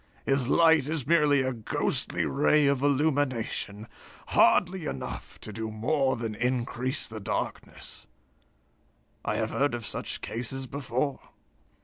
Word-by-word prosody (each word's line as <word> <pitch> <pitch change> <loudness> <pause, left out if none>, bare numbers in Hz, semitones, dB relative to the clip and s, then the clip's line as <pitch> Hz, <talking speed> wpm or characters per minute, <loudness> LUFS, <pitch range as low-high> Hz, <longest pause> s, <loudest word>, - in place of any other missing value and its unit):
His 135 -2 +2
light 160 -2 +4
is 155 -5 -2
merely 150 -3 +4
a 130 0 -1
ghostly 110 -3 -1
ray 150 +1 +3
of 140 -2 +2
illumination, 135 -7 0 0.4
hardly 180 -2 +3
enough 65 - -6
to 110 - -7
do 110 +1 -4
more 130 +5 +1
than 115 -2 -4
increase 125 +3 -1
the 110 -1 -7
darkness. 100 - -5 1.2
I - - -1
have - - -1
heard 145 -2 +1
of 120 -2 -6
such - - -4
cases 125 +3 -3
before." 130 +1 -2
130 Hz, 125 wpm, -28 LUFS, 115-145 Hz, 1.2 s, light